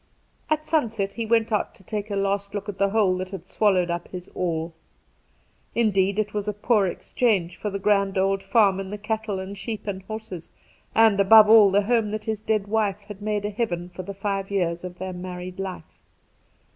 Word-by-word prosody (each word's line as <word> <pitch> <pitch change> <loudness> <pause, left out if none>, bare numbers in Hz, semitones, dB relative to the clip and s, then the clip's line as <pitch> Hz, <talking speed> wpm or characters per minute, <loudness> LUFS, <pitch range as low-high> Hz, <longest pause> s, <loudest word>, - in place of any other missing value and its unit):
At 310 0 0
sunset 225 -11 0
he 230 -1 -4
went 225 0 +2
out 210 - -1
to 190 - -19
take 210 +2 -4
a 200 - -2
last 200 +1 -1
look 205 0 -4
at 200 -2 -6
the 200 0 +3
hole 200 -3 +2
that 185 0 -4
had 190 -3 -8
swallowed 185 -3 +2
up 170 0 -3
his 180 -1 -9
all. 165 -2 -2 1.0
Indeed, 200 -4 +2
it 210 -1 -1
was 210 0 -3
a 210 - 0
poor 210 -1 +2
exchange 185 -2 0
for 210 - -4
the 200 - -3
grand 200 -1 +1
old 195 +1 +1
farm 195 -1 +3
and 195 0 -5
the 210 - -4
cattle 215 -1 -3
and 190 +1 -6
sheep 215 +1 -6
and 195 -2 -4
horses, 195 -4 -8 0.5
and, 225 -3 +5
above 215 +2 +8
all, 215 -3 +8
the 200 +2 +3
home 225 0 +1
that 215 0 -4
his 220 -2 -2
dead 215 -2 0
wife 210 -2 0
had 205 0 -11
made 210 -1 -1
a 210 - -2
heaven 195 -5 -2
of 180 - -13
for 180 - -7
the 200 +2 -7
five 195 -1 -2
years 175 -4 -1
of 180 -1 -7
their 185 0 -5
married 180 0 -7
life. 185 -4 -7
200 Hz, 210 wpm, -24 LUFS, 190-215 Hz, 1.0 s, above